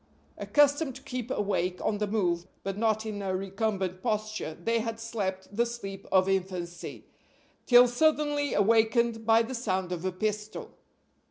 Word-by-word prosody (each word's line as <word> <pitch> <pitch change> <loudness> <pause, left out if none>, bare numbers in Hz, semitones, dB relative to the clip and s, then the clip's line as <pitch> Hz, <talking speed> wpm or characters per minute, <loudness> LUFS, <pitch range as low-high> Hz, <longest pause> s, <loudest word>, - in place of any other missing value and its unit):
Accustomed 290 -1 +3
to - - -11
keep 250 -1 -5
awake 190 -5 -1
on 210 -1 -1
the 210 - 0
move, 180 -5 0 0.2
but 195 0 -3
not 220 0 +1
in 210 -2 -4
a 190 -1 -1
recumbent 195 -1 -2
posture, 215 -7 -2
they 230 +6 +1
had 225 0 -4
slept 200 -4 -4
the 235 - +3
sleep 195 -5 -7
of 190 0 +4
infancy, 180 -2 -3 0.6
till 245 0 +8
suddenly 290 +2 +1
awakened 225 +1 +2
by 225 0 +6
the 230 - -6
sound 190 -7 -2
of 175 -1 -3
a 185 - 0
pistol. 210 +3 -3
215 Hz, 155 wpm, -28 LUFS, 190-230 Hz, 0.6 s, till